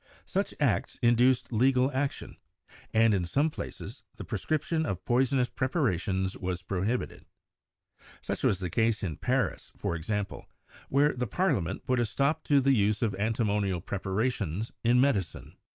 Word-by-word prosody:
Such -, -, -2 dB
acts -, -, 0 dB
induced 120 Hz, +1 st, +3 dB
legal 130 Hz, +3 st, +3 dB
action, 135 Hz, +1 st, -3 dB, 0.5 s
and 115 Hz, 0 st, +4 dB
in 95 Hz, -3 st, +1 dB
some 145 Hz, -, +1 dB
places -, -, -8 dB
the -, -, -7 dB
prescription 160 Hz, +1 st, -1 dB
of 95 Hz, -, -4 dB
poisonous 130 Hz, +1 st, +2 dB
preparations 95 Hz, -, -1 dB
was 90 Hz, -1 st, -4 dB
prohibited. 100 Hz, +7 st, -2 dB, 0.9 s
Such -, -, -4 dB
was 100 Hz, -, +2 dB
the 90 Hz, -2 st, -4 dB
case 115 Hz, +1 st, +1 dB
in 85 Hz, -6 st, -3 dB
Paris, -, -, -1 dB
for 85 Hz, -, -2 dB
example, 100 Hz, +5 st, -4 dB, 0.4 s
where 145 Hz, +2 st, +3 dB
the 125 Hz, 0 st, -2 dB
parliament 105 Hz, -, -1 dB
put 130 Hz, -1 st, +1 dB
a 120 Hz, -, +2 dB
stop 140 Hz, +7 st, 0 dB
to 145 Hz, -1 st, +4 dB
the 135 Hz, 0 st, +3 dB
use 105 Hz, -1 st, +2 dB
of 110 Hz, -3 st, +1 dB
antimonial 105 Hz, -2 st, 0 dB
preparations 100 Hz, +1 st, -2 dB
in 120 Hz, +1 st, +4 dB
medicine. 125 Hz, -, 0 dB
115 Hz, 145 wpm, -29 LUFS, 95-130 Hz, 0.9 s, and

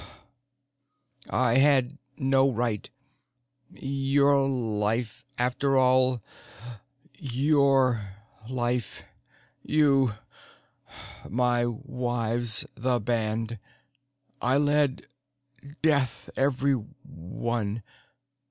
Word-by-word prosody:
I 125 Hz, -1 st, +2 dB
had 140 Hz, 0 st, +3 dB, 0.2 s
no 135 Hz, 0 st, +3 dB
right. 115 Hz, -3 st, -2 dB, 0.8 s
Your 140 Hz, -2 st, +1 dB
life 110 Hz, -2 st, -2 dB
after 130 Hz, +3 st, +1 dB
all 130 Hz, -2 st, +3 dB, 1.0 s
your 135 Hz, -3 st, +2 dB, 0.5 s
life. 120 Hz, -3 st, -2 dB, 0.6 s
You 135 Hz, -6 st, +2 dB, 1.1 s
my 120 Hz, +1 st, +1 dB
wives 120 Hz, 0 st, -1 dB
the 125 Hz, 0 st, 0 dB
band. 115 Hz, 0 st, -2 dB, 0.8 s
I 130 Hz, +3 st, +2 dB
led 145 Hz, -2 st, +1 dB, 0.8 s
death 140 Hz, -6 st, +1 dB
everyone. 115 Hz, -5 st, -2 dB
125 Hz, 60 wpm, -27 LUFS, 115-135 Hz, 1.1 s, had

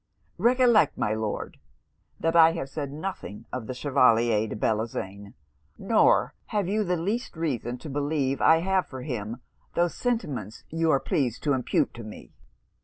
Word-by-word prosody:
Recollect, 245 Hz, -2 st, +4 dB
my 105 Hz, -, 0 dB
Lord, 110 Hz, -1 st, -4 dB, 0.6 s
that 165 Hz, 0 st, 0 dB
I 165 Hz, -1 st, +7 dB
have 150 Hz, -5 st, -4 dB
said 145 Hz, -2 st, -4 dB
nothing 155 Hz, -, -6 dB
of 125 Hz, -4 st, -4 dB
the 130 Hz, -, -5 dB
Chevalier 120 Hz, -5 st, +3 dB
de -, -, -5 dB
Bellozane, 105 Hz, -2 st, -3 dB, 0.4 s
nor -, -, +3 dB
have 205 Hz, -4 st, -1 dB
you 210 Hz, +3 st, +1 dB
the 180 Hz, -2 st, 0 dB
least 200 Hz, +3 st, -3 dB
reason 125 Hz, -7 st, -2 dB
to 155 Hz, -, -10 dB
believe 145 Hz, -1 st, -1 dB
I 160 Hz, 0 st, +5 dB
have 190 Hz, +1 st, +1 dB
for 130 Hz, -2 st, -8 dB
him 120 Hz, -3 st, -5 dB, 0.3 s
those 175 Hz, 0 st, +2 dB
sentiments 150 Hz, -, -3 dB
you 165 Hz, 0 st, +1 dB
are 140 Hz, -, +4 dB
pleased 130 Hz, -4 st, -1 dB
to 145 Hz, -, +2 dB
impute 130 Hz, -2 st, 0 dB
to 120 Hz, -, -9 dB
me.' 105 Hz, 0 st, -11 dB
140 Hz, 160 wpm, -26 LUFS, 115-170 Hz, 0.6 s, I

